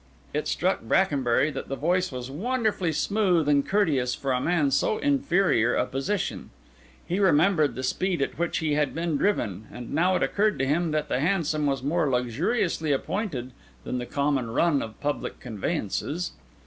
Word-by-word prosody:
It 150 +1 -1
struck 185 +2 0
Brackenbury 145 -5 +2
that - - -6
the 135 - -2
voice 180 +5 0
was 125 0 -6
wonderfully 215 - 0
smooth 180 -2 +1
and 145 -1 +4
courteous 145 -12 +1
for 135 - -2
a 125 0 +1
man 175 +2 +1
in 140 - +1
so 140 +10 +2
inferior 195 - +2
a - - +2
position; 135 +10 -3 0.6
he 180 +3 -1
remembered 170 -4 +3
the 130 - -5
speed 180 +7 0
at 140 - -2
which 170 0 0
he 155 -2 0
had 145 -1 0
been 165 -1 -1
driven; 110 - -1
and 120 -1 -8
now 180 +5 +3
it - - +1
occurred 210 0 +1
to 135 - 0
him 160 +5 +1
that 155 -1 -1
the - - 0
hansom 155 -2 +1
was 135 -2 -1
more 150 +1 +1
luxuriously 155 - 0
appointed 140 - -2 0.3
than 125 - -3
the 120 - -5
common 140 -4 0
run 145 +4 +2
of 110 -1 -7
public 145 0 -3
conveyances. 140 - -3
150 Hz, 175 wpm, -26 LUFS, 135-185 Hz, 0.6 s, and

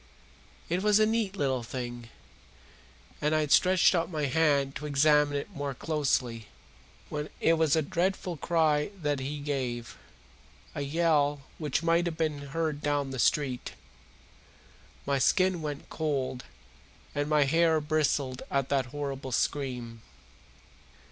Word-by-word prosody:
It 175 +2 0
was 210 +1 +4
a 215 - +5
neat 220 -3 0
little 135 -5 0
thing, 120 0 -6 1.1
and 150 +1 +2
I 155 - +3
had 150 -2 -2
stretched 185 0 +5
out 170 -1 0
my 155 -4 -2
hand 140 -1 +2
to 150 - -6
examine 145 0 +3
it 140 - -5
more 145 -6 -4
closely, 125 -7 -1 0.6
when 150 0 -4
It 165 - +4
was 160 -2 +3
a 160 - +2
dreadful 180 +3 -1
cry 155 -1 +1
that 145 -3 -1
he 140 +3 -4
gave 130 -5 -4 0.7
a - - -4
yell 145 -1 +1 0.2
which 150 0 -1
might 170 +1 +2
have 165 -2 -4
been 150 -3 -2
heard 155 0 -2
down 145 -2 0
the 130 - -5
street. 130 -1 0 1.3
My 140 -1 +1
skin 185 +5 +2
went 145 -2 -5
cold 140 -5 -2 0.7
and 145 +1 -1
my 150 -1 +4
hair 160 +3 +3
bristled 150 -4 0
at 135 -1 0
that 135 -2 +1
horrible 135 -1 -5
scream. 125 -4 -2
145 Hz, 140 wpm, -29 LUFS, 135-160 Hz, 1.3 s, a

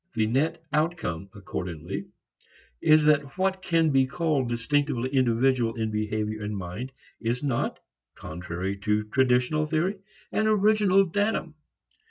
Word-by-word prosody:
The 110 -1 +2
net 140 +8 0
outcome 150 - -1
accordingly 90 0 -5 0.7
is 155 0 +5
that 150 0 +2
what 190 0 0
can 165 -4 +2
be 135 -1 +3
called 150 -4 0
distinctively 130 +1 0
individual 125 -2 +2
in 110 -2 -2
behavior 110 0 -2
and 105 0 -3
mind 95 +8 -6 0.3
is 120 +4 -2
not, 135 -5 -1 0.4
contrary 90 +4 -5
to 105 +1 0
traditional 125 +6 +2
theory, 170 +6 0 0.3
an 215 - +1
original 205 -2 +4
datum. 205 -2 -1
130 Hz, 125 wpm, -26 LUFS, 105-160 Hz, 0.7 s, is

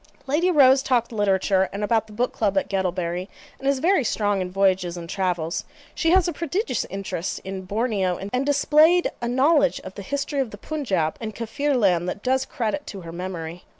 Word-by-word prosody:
Lady 305 +6 +1
Rose 270 -5 +6
talked 245 -3 +1
literature, 195 -2 +2
and 200 +2 -4
about 220 +1 +1
the - - -14
book 240 +4 -1
club 200 -3 0
at 195 - +1
Guttlebury, 180 -2 -2 0.3
and 270 - -4
is 275 0 +3
very 330 +2 +2
strong 205 -3 0
in 180 - -3
voyages 185 -2 +1
and 170 -1 -7
travels. 175 -3 -1 0.3
She 325 - 0
has 365 0 +4
a 345 - -1
prodigious 335 - -2
interest 195 -3 -4
in 190 -1 -6
Borneo, 200 -3 0
and 225 +7 -2
displayed 305 +5 +4
a 235 - -1
knowledge 280 +3 +3
of 190 - -9
the 200 - -8
history 280 +5 -3
of 265 -4 0
the 205 - -10
Punjaub 195 - -2
and 220 -1 -5
Kaffirland 230 - +1
that 200 - -6
does 265 +1 +1
credit 250 +5 -3
to 195 - -7
her 165 -1 -8
memory. 175 -1 -6
210 Hz, 190 wpm, -24 LUFS, 190-275 Hz, 0.3 s, Rose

